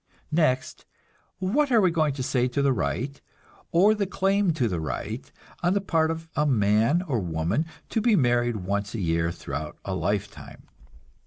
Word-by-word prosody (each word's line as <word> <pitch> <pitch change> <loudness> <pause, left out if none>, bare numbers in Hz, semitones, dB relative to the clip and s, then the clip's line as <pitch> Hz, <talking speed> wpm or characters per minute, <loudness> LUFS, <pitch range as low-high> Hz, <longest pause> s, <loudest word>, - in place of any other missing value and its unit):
Next, 155 -5 0 0.5
what 265 +10 +1
are 235 - +6
we 185 -4 +4
going 155 -3 +1
to 130 - -3
say 125 -1 +1
to 140 +3 -1
the 140 -1 +3
right, 125 - -2 0.5
or 195 +6 +5
the 205 -2 -1
claim 195 0 +1
to 130 -6 0
the 90 -6 -2
right, 80 - -5 0.3
on 175 +2 +2
the - - +3
part 165 -5 +1
of 165 0 -4
a 150 - +2
man 115 - +3
or 140 -10 -1
woman, 90 - -1 0.2
to 225 - 0
be 230 -1 +4
married 120 - +2
once 100 +2 -2
a - - -3
year 85 -2 0
throughout 75 -1 -6
a - - -2
lifetime? - - -3
140 Hz, 175 wpm, -26 LUFS, -, 0.5 s, are